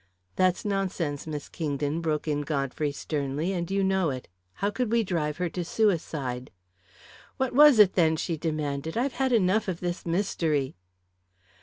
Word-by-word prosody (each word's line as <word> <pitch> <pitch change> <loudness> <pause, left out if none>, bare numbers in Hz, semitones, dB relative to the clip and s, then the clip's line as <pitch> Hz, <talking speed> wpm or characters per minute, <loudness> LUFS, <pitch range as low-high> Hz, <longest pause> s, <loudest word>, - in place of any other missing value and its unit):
"That's 185 +1 +2
nonsense, 185 -8 -2
Miss 150 -2 -5
Kingdon," 150 -1 -2
broke 155 -1 -1
in 145 -1 0
Godfrey 145 0 -1
sternly, 145 +4 -2
"and 170 -2 -3
you 195 0 +1
know 190 -3 +2
it! 130 -2 -5 0.3
How 200 +1 -1
could 245 0 -2
we 230 -1 +3
drive 155 -6 -1
her 180 - 0
to 175 +2 -3
suicide?" 155 - -1 0.9
"What 260 -1 -1
was 295 -1 +8
it, 205 -3 +7
then?" 160 -3 +3
she 165 +1 -2
demanded. 155 +1 -3
"I've 255 +2 0
had 265 -1 +2
enough 215 -1 +3
of 180 -3 -2
this 175 0 -3
mystery." 165 -6 0
170 Hz, 160 wpm, -27 LUFS, 150-195 Hz, 0.9 s, was